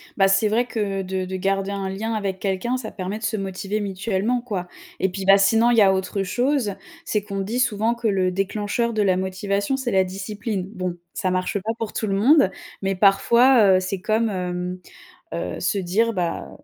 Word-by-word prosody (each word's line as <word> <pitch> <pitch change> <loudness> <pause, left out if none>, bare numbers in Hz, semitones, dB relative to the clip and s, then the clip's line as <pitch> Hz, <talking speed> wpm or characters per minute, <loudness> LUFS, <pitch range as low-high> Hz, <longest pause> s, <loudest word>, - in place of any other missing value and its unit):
Bah, 195 -1 +4
c'est 195 +2 +3
vrai 230 +4 +1
que 205 -5 -2
de 190 0 -3
de 190 +1 -5
garder 195 +1 -1
un 195 -1 -3
lien 215 +4 -3
avec 200 -3 -2
quelqu'un, 200 +7 -1
ça 235 -4 -6
permet 190 +2 -4
de 220 - -13
se 220 - 0
motiver 195 +2 -3
mutuellement, 200 +4 -1
quoi, 195 -7 -4 0.3
et 190 - +1
puis, 190 +1 -5
bah, 195 +1 +7
sinon 225 +4 +4
il 235 - +2
y 220 - +7
a 190 -1 +6
autre 190 +1 -1
chose, 245 0 0 0.3
c'est 210 -2 -1
qu'on 200 -2 -4
dit 225 +6 -2
souvent 230 -2 +1
que 235 -1 -2
le 190 -3 +1
déclencheur 205 +4 -1
de 215 - +1
la 185 -3 +3
motivation, 200 +5 -1
c'est 260 -3 -2
la 190 -1 +4
discipline. 195 +1 -4
Bon, 185 -3 -3 0.2
ça 185 - -1
marche 185 +2 -1
pas 215 +4 -2
pour 225 -2 -4
tout 220 - -2
le 195 - -1
monde, 230 0 +5 0.3
mais 195 0 0
parfois, 210 +2 +5
heu, - - +2
c'est 185 0 -4
comme, 220 +2 +1
hem, 180 -1 -3 0.5
heu, 85 +1 -4
se 185 - 0
dire: 200 +5 +1
«Bah, 170 - -2
195 Hz, 210 wpm, -23 LUFS, 190-220 Hz, 0.5 s, bah